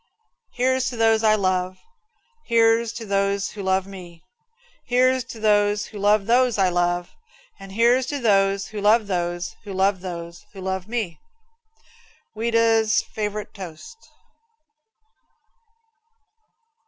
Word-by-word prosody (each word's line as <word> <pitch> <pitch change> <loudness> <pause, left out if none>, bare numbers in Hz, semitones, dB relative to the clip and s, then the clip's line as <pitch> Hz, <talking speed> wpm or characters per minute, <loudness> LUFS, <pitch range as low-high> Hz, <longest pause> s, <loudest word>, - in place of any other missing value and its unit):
Here's 260 +1 +1
to 245 - -7
those 225 0 +3
I 215 -1 +5
love; 185 -2 -1 0.7
Here's 230 0 +3
to 230 -1 -7
those 200 0 0
who 210 - -8
love 190 0 0
me; 180 -3 -12 0.6
Here's 255 +1 +2
to 230 -1 -10
those 205 -1 +2
who 210 - -10
love 205 0 +3
those 245 0 +3
I 190 -2 +3
love, 175 0 -1 0.5
And 195 0 -11
here's 240 +4 +3
to 290 - -3
those 195 -5 +1
who 215 -1 -6
love 215 +2 +4
those 175 -2 -3
who 205 - -8
love 190 0 +1
those 170 -2 -7
who 195 - -10
love 190 0 -3
me. 215 -9 -3 1.2
Ouida's 225 -1 +2
Favorite 210 -1 -4
Toast. 190 - -11
205 Hz, 125 wpm, -23 LUFS, 190-230 Hz, 1.2 s, I